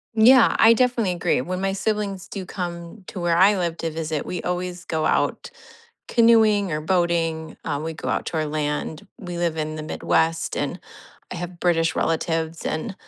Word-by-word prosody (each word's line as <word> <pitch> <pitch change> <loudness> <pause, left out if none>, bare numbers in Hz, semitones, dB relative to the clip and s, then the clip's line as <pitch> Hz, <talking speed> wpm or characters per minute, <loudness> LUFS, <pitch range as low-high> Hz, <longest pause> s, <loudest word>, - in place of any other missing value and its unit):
Yeah. 240 +3 +6
I 225 +1 +8
definitely 240 -5 +1
agree. 170 -6 0
When 185 +6 -4
my 195 0 0
siblings 200 -2 -2
do 195 -3 -6
come 175 +1 -6
to - - -7
where 175 -1 +1
I 195 +3 +5
live 170 -2 -2
to 165 - -2
visit, 155 -1 -3
we 180 - -4
always 180 0 -3
go 155 -1 -1
out - - 0 0.6
canoeing 220 -5 +4
or 150 - -1
boating, 165 -2 0
um, 145 -1 -2
we 160 0 -3
go - - -6
out - - -1
to - - -3
our 155 - 0
land. 150 +4 -3
We 175 -2 -7
live 170 -2 0
in 155 0 -3
the 155 - -5
Midwest, 165 +1 0
and 145 +6 -2 0.5
I - - -5
have 175 0 -7
British 165 -2 +2
relatives, 165 0 -1
and 195 +6 -3
175 Hz, 185 wpm, -23 LUFS, 160-195 Hz, 0.6 s, I